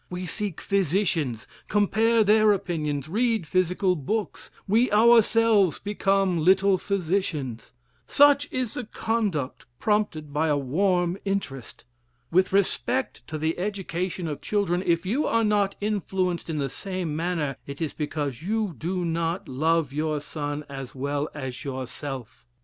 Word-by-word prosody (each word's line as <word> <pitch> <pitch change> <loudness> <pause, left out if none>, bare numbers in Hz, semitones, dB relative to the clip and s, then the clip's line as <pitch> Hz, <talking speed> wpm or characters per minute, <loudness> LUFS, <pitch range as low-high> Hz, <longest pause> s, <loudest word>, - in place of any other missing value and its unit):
We 180 0 -4
seek 195 +1 -4
physicians, 170 - 0 0.2
compare 220 +2 +3
their 215 0 +5
opinions, 155 -8 -2
read 225 +1 +1
physical 185 +3 +1
books, 200 +8 -3 0.2
we 230 +6 +3
ourselves 225 -4 +5
become 195 -3 +1
little 190 +2 +4
physicians. 170 - -2 0.4
Such 285 0 +5
is 255 -4 -1
the 250 - -4
conduct 210 - -2
prompted 205 -9 0
by 155 +2 +1
a 145 -2 +2
warm 175 +6 +1
interest. 195 - -4 0.5
With 185 +2 +3
respect 200 +6 0
to 155 - -4
the 160 +3 -1
education 185 -3 -3
of 150 -2 -5
children, 190 -4 0
if 170 -1 +1
you 245 +11 0
are 230 0 +2
not 205 -2 +2
influenced 190 -4 -1
in 160 - -2
the 140 -2 0
same 180 +2 -4
manner, 160 -4 -1
it 140 0 -7
is 160 -3 -2
because 145 -4 -3
you 210 +1 -1
do 175 +7 -2
not 165 +1 -1
love 155 +1 +1
your 155 0 -1
son 145 0 -4
as 135 -2 -8
well 140 +3 -2
as 130 -2 -5
yourself. 130 -2 -6
180 Hz, 140 wpm, -26 LUFS, 150-205 Hz, 0.5 s, their